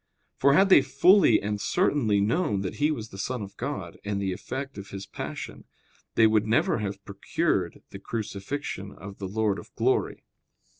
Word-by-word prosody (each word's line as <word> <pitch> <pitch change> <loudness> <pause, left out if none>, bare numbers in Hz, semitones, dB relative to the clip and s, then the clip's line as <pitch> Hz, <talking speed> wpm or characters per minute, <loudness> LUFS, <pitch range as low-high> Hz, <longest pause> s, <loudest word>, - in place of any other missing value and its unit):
For 140 - +4
had 195 +6 +5
they 185 - +8
fully 155 +8 +5
and 105 0 -2
certainly 135 - +2
known 105 - +1
that 95 - -4
He 150 +1 +2
was 115 -8 -3
the 95 - -10
Son 125 +2 -3
of 100 0 -10
God - - -5
and 100 -1 -2
the 95 -2 -1
effect 135 +5 -6
of 100 0 -9
His 95 0 -7
passion, - - -7 0.5
they 115 - +6
would 110 -1 +3
never 115 +1 +2
have 100 -1 -5
procured 100 -1 -1
the - - -8
crucifixion 100 -1 -5
of 95 +2 -10
the 95 - -4
Lord 105 0 0
of - - -13
glory. - - 0
105 Hz, 180 wpm, -27 LUFS, 100-135 Hz, 0.5 s, they